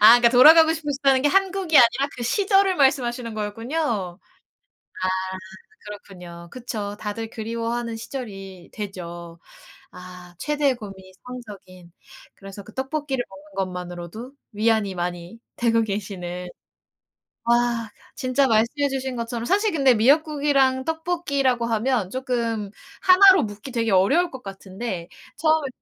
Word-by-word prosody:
아 225 +3 +9
그러니까 240 -1 +5
돌아가고 320 +6 +8
싶으시다는 280 -4 +1
게 295 - +4
한국이 380 -2 +1
아니라 240 +4 +4
그 245 - -6
시절을 390 - +2
말씀하시는 250 -4 +1
거였군요. 220 +7 -5 1.3
아 - - +2 0.8
그렇군요. 180 -4 -11
그쵸. 215 -5 -5
다들 220 +2 -5
그리워하는 230 +1 -4
시절이 195 -7 -8
되죠. 175 -5 -8 0.5
아 180 -1 -12
최대의 290 -1 0
고민이 195 -4 -11
성적인 195 -8 -11 0.4
그래서 195 0 -11
그 215 - -15
떡볶이를 270 -1 -3
먹는 195 +1 -15
것만으로도 180 +6 -8 0.2
위안이 215 -2 +1
많이 175 +3 -5 0.2
되고 230 -1 +2
계시는. 185 -4 -5 1.0
아 235 -1 +1
그 - - -23 0.2
진짜 270 0 +1
말씀해 235 +5 +2
주신 265 -1 -3
것처럼 235 0 -4
사실 410 - +2
근데 275 -5 +4
미역국이랑 275 +1 +2
떡볶이라고 320 -7 -1
하면 230 -3 0
쪼끔 235 -5 -2 0.3
하나로 380 -1 +7
묶기 210 +4 -8
되게 230 -2 0
어려울 205 - +3
것 260 -1 -10
같은데 195 -2 -6 0.3
처음에 315 -3 +2
235 Hz, 315 characters per minute, -23 LUFS, 200-275 Hz, 1.3 s, 아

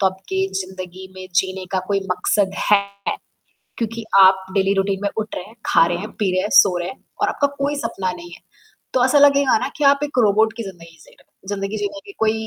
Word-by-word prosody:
तो 190 - +4
आपके 190 0 -2
जिंदगी 185 0 -8
में 185 0 -9
जीने 190 +1 0
का 190 - +1
कोई 200 -1 +1
मकसद 190 +2 +1 0.2
है। 200 -1 +6 1.0
क्योंकि 230 0 -3 0.2
आप 190 0 +6
डेली 195 0 +2
रूटीन 195 0 0
में 200 - +1
उठ 215 -1 -3
रहे - - -5
हैं, 225 +3 -16
खा 165 - +4
रहे 175 0 -1
हैं, 210 +4 -6
पी 200 -3 0
रहे 185 0 +1
हैं, 205 - -2
सो 180 -3 +6
रहे 175 +1 -3
हैं 260 - -11 0.2
और - - +3
आपका 285 - +1
कोई 285 +1 0
सपना 190 -10 -3
नहीं 175 -1 -11
है। 175 - -12 0.5
तो 250 -1 +3
ऐसा 270 +3 +4
लगेगा 280 -3 +5
न - - -3
कि 300 - -2
आप 280 0 +5
एक 290 -3 -5
रोबोट 220 +1 +3
की 230 - -4
ज़िंदगी 170 -4 -11
जी - - -19
रहे - - -25
ज़िंदगी 205 +1 -3
जीने 205 +9 -4
के 400 - -10
कोई 220 -1 +2
195 Hz, 230 wpm, -20 LUFS, 185-225 Hz, 1.0 s, है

